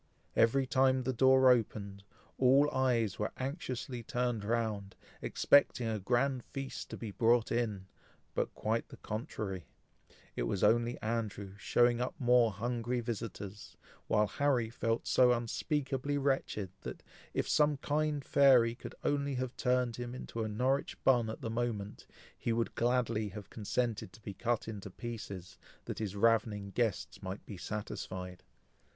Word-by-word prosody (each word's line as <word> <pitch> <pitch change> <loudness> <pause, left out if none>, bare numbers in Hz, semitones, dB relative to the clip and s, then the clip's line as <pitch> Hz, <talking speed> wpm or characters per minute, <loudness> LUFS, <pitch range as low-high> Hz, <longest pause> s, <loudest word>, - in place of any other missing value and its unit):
Every 130 +4 +4
time 130 -1 +3
the 130 +1 -1
door 130 +1 +6
opened, 100 -4 -1 0.4
all 135 +3 +5
eyes 120 -7 +1
were 105 - -1
anxiously 130 -2 -4
turned 120 -1 -1
round, 110 -3 -1 0.3
expecting 135 -4 +3
a 110 -1 -1
grand 125 +5 +1
feast 135 -1 -6
to - - -6
be 110 -3 -5
brought 115 +3 +3
in; 110 -5 -1 0.5
but - - -1
quite 110 +2 -1
the - - -11
contrary 105 - -5 0.7
it - - -2
was 95 - -1
only 120 +3 +3
Andrew 105 -3 -3
showing 120 +4 +3
up 125 - -2
more 120 -2 +4
hungry 120 +3 -2
visitors; 110 -3 -6 0.3
while 105 0 +3
Harry 120 +1 +1
felt 115 -1 -1
so 125 -1 +5
unspeakably 135 +3 -1
wretched, 135 -8 0
that, - - -7 0.3
if - - 0
some 150 -1 +3
kind 150 0 -1
fairy 130 -5 +6
could 120 - -9
only 140 -1 0
have 130 0 -3
turned 125 -2 +1
him 120 0 -5
into 115 -2 -4
a - - -2
Norwich 130 +6 0
bun 120 -4 +4
at 110 - -6
the 110 - -3
moment, 115 -3 -3 0.3
he 115 - -2
would 115 0 0
gladly 115 -3 +1
have 100 +1 -9
consented 110 -2 -2
to 110 - -15
be 100 - -5
cut 120 +3 -1
in 105 -3 -5
pieces, 100 -2 -7 0.3
that - - -5
his 105 -3 -3
ravenous 105 -2 +2
guests 115 -5 -1
might 95 +1 -6
be 105 - -7
satisfied. 90 -2 -5
115 Hz, 150 wpm, -33 LUFS, 105-130 Hz, 0.7 s, door